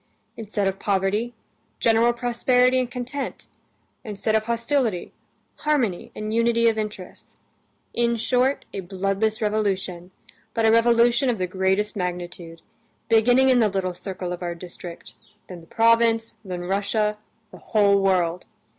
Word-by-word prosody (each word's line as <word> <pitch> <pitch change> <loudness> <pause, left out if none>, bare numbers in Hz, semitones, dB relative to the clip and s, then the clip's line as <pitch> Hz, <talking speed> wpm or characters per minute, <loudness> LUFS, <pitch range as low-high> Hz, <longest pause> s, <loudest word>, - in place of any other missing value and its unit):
Instead 210 -2 -2
of 195 0 -2
poverty, 205 +4 0 0.4
general 230 +1 +3
prosperity 250 +1 +2
and 250 -2 -1
content; 255 +3 -5 0.6
instead 215 -1 -2
of 220 0 +1
hostility, 235 -4 -1 0.4
harmony 255 -12 -1
and 215 0 -4
unity 230 0 +3
of 225 - +3
interests. 210 -4 -7 0.6
In 235 0 +1
short, 250 +4 +1
a - - -4
bloodless 195 +4 -1
revolution, 195 -4 -1 0.5
but 225 - +2
a 220 - +5
revolution 235 +2 +4
of 235 - 0
the 185 - -1
greatest 190 +3 0
magnitude, 175 -3 -5 0.5
beginning 245 +4 +4
in 255 -1 +5
the 220 -3 +3
little 190 -2 -2
circle 180 -1 -5
of 180 - -7
our 175 -1 -3
district, 175 0 -10 0.3
then 180 -2 -9
the 165 - -18
province, 230 +1 +3
then 180 -3 -5
Russia, 205 +3 -1 0.3
the - - -12
whole 200 -2 +3
world. 180 -2 +1
215 Hz, 135 wpm, -23 LUFS, 190-235 Hz, 0.6 s, a